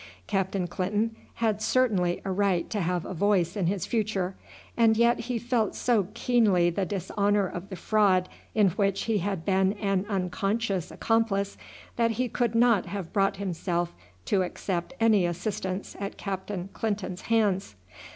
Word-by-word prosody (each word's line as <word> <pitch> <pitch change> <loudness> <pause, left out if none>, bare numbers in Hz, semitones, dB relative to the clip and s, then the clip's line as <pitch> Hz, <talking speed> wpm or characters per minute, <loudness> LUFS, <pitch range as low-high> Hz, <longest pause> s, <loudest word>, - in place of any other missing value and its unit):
Captain 190 - -1
Clinton 205 +6 -1 0.2
had 220 -2 0
certainly 205 -8 +2
a 195 - -1
right 190 -2 +1
to 210 - -1
have 175 0 -1
a - - -5
voice 185 -2 +2
in 190 -5 0
his 190 -1 -1
future, 205 -5 -1 0.4
and 225 -2 +4
yet 235 +1 +4
he 240 +1 -2
felt 235 -3 0
so 225 -7 +2
keenly 215 -8 +3
the 190 +2 -1
dishonour 200 +1 +1
of 180 +1 -6
the 190 - -5
fraud 185 -1 +2 0.3
in 210 -3 +5
which 195 +1 0
he 225 -2 +1
had 190 -2 -3
been 190 0 +3
an 200 -2 -1
unconscious 195 0 -1
accomplice, 215 -3 0 0.4
that 230 -1 +3
he 255 0 +1
could 235 -1 -1
not 230 -5 +4
have 185 -2 -5
brought 195 -1 +2
himself 175 -2 -2 0.3
to 195 - +2
accept 180 +4 -3
any 220 -4 +4
assistance 185 +2 -3
at 200 0 -5
Captain 195 -1 -4
Clinton's 205 -4 -3
hands. 200 - +1
200 Hz, 155 wpm, -27 LUFS, 185-220 Hz, 0.4 s, in